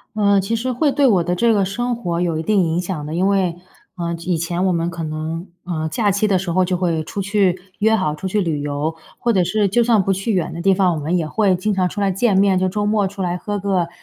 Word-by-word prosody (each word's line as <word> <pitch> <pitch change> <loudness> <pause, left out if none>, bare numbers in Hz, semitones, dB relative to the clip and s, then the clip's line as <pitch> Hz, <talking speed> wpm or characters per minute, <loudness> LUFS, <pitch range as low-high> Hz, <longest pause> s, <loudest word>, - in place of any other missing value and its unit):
呃， 200 -2 +3
其 195 +4 -1
实 250 +3 -2
会 275 +3 +1
对 285 - +3
我 185 -7 +3
的 180 +1 0
这 230 +4 +3
个 200 -2 +2
生 240 +5 -2
活 175 -7 -2
有 170 -3 0
一 160 - -3
定 200 0 +2
影 165 +1 0
响 175 -5 -4
的。 150 - -5
因 180 +3 +1
为， 190 -4 +1 0.4
呃， 170 -1 -2
以 180 -2 +1
前 175 +3 -1
我 185 - +2
们 170 0 0
可 165 -1 -6
能， 160 +3 -4 0.2
呃， 160 -3 -2
假 205 +6 +1
期 200 +2 +1
的 195 -3 +2
时 185 -1 -4
候 185 - +3
就 180 0 0
会 170 -3 0
出 200 - -5
去 195 -2 +1 0.2
约 220 +2 +3
好 155 -8 0
出 155 - -8
去 190 +3 0
旅 165 -6 -1
游。 145 +2 -2 0.2
或 235 - +1
者 185 -3 +3
是 210 +2 +1
就 235 +5 +2
算 225 -3 +3
不 195 +1 +1
去 195 +4 -2
远 180 -5 -1
的 170 - -5
地 195 +2 +4
方， 185 -2 +2
我 - - -3
们 170 +5 0
也 160 - -1
会 200 +3 +2
经 210 +3 -1
常 185 -1 +1
出 205 - -6
来 200 -1 +1
见 195 +1 +2
面。 195 -1 +4
就 185 0 +1
周 205 +2 -2
末 210 -1 +2
出 200 0 -7
来 175 -1 -1
喝 205 +3 -4
个， 185 -4 0
185 Hz, 300 characters per minute, -20 LUFS, 170-205 Hz, 0.4 s, 地